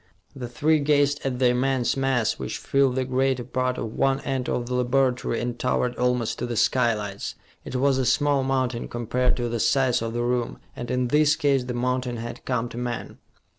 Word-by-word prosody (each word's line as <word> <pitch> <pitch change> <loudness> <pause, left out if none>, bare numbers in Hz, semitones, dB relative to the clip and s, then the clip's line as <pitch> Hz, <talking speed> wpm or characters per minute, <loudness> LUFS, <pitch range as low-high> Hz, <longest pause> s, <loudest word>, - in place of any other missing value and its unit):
The 125 -3 -6
three 155 +5 +2
gazed 145 0 +2
at 130 -2 -1
the 125 -1 +4
immense 125 0 +1
mass, 135 -5 0
which - - -4
filled 135 -2 +1
the 130 -1 0
greater 130 0 0
part 130 +1 -1
of 110 - -4
one 135 0 +1
end 130 -2 -2
of 120 - -1
the 125 - -4
laboratory 125 -1 +1
and 120 0 -3
towered 125 -1 0
almost 125 -2 0
to - - -2
the 120 -2 -3
skylights. 105 -5 0 0.3
It - - -7
was 135 +1 +2
a 130 - +1
small 140 +1 +2
mountain, 130 -3 -1
compared 120 +1 0
to 120 -1 -1
the 120 0 -2
size 130 0 +2
of 115 0 -3
the 120 0 -1
room, 120 -1 -1 0.2
and 120 -1 -6
in 125 -1 0
this 150 +1 +4
case 140 -5 +1
the 125 -1 -4
mountain 125 0 -1
had 115 +1 -7
come 125 -2 -1
to 120 - -7
man. 120 -1 -5
125 Hz, 205 wpm, -25 LUFS, 120-135 Hz, 0.3 s, the